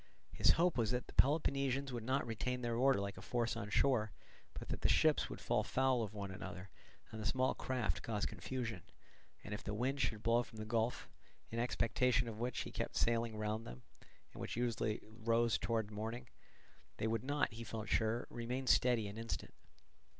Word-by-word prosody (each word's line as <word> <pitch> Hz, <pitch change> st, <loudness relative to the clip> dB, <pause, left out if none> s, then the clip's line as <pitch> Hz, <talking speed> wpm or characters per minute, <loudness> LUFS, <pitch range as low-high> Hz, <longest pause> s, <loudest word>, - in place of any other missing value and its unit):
His -, -, +5 dB
hope 170 Hz, -5 st, +2 dB
was 110 Hz, -2 st, +2 dB
that 125 Hz, 0 st, 0 dB
the -, -, -13 dB
Peloponnesians 140 Hz, -2 st, +2 dB
would 120 Hz, -2 st, -3 dB
not 130 Hz, +4 st, +1 dB
retain 125 Hz, +2 st, -2 dB
their 120 Hz, -1 st, 0 dB
order 130 Hz, 0 st, +4 dB
like 100 Hz, -1 st, -3 dB
a -, -, -8 dB
force 120 Hz, +4 st, 0 dB
on 100 Hz, -, -4 dB
shore, 110 Hz, -1 st, +3 dB, 0.4 s
but -, -, -7 dB
that -, -, -3 dB
the -, -, +3 dB
ships -, -, +4 dB
would -, -, -6 dB
fall -, -, +1 dB
foul 130 Hz, -2 st, +2 dB
of 105 Hz, -1 st, -4 dB
one 100 Hz, -2 st, -4 dB
another 95 Hz, 0 st, -7 dB, 0.4 s
and 110 Hz, -, -6 dB
the -, -, -5 dB
small 130 Hz, 0 st, +2 dB
craft 130 Hz, -1 st, -1 dB
cause 105 Hz, -2 st, -1 dB
confusion; 115 Hz, -7 st, -4 dB, 0.6 s
and 105 Hz, -, -5 dB
if 105 Hz, -, -5 dB
the 105 Hz, -, -3 dB
wind 135 Hz, +5 st, 0 dB
should 110 Hz, -2 st, 0 dB
blow 115 Hz, +1 st, +4 dB
from 115 Hz, -2 st, -10 dB
the 110 Hz, -, -4 dB
gulf 115 Hz, +2 st, 0 dB, 0.4 s
(in 115 Hz, -, -2 dB
expectation 125 Hz, +1 st, +2 dB
of 110 Hz, -2 st, -6 dB
which 120 Hz, +1 st, -1 dB
he -, -, -5 dB
kept -, -, -3 dB
sailing 115 Hz, -1 st, +1 dB
round 110 Hz, +1 st, -2 dB
them, -, -, -9 dB, 0.5 s
and -, -, -9 dB
which -, -, -3 dB
usually 115 Hz, -2 st, 0 dB
rose 115 Hz, +1 st, +1 dB
towards 110 Hz, -2 st, -1 dB
morning), 110 Hz, +3 st, -4 dB, 0.7 s
they -, -, -1 dB
would 115 Hz, 0 st, 0 dB
not, 145 Hz, -2 st, 0 dB
he 115 Hz, +1 st, -6 dB
felt 110 Hz, -1 st, -5 dB
sure, 110 Hz, +1 st, +1 dB
remain 125 Hz, +3 st, -3 dB
steady 120 Hz, -4 st, +4 dB
an 100 Hz, +2 st, -7 dB
instant. 115 Hz, 0 st, -4 dB
115 Hz, 195 wpm, -37 LUFS, 110-125 Hz, 0.7 s, His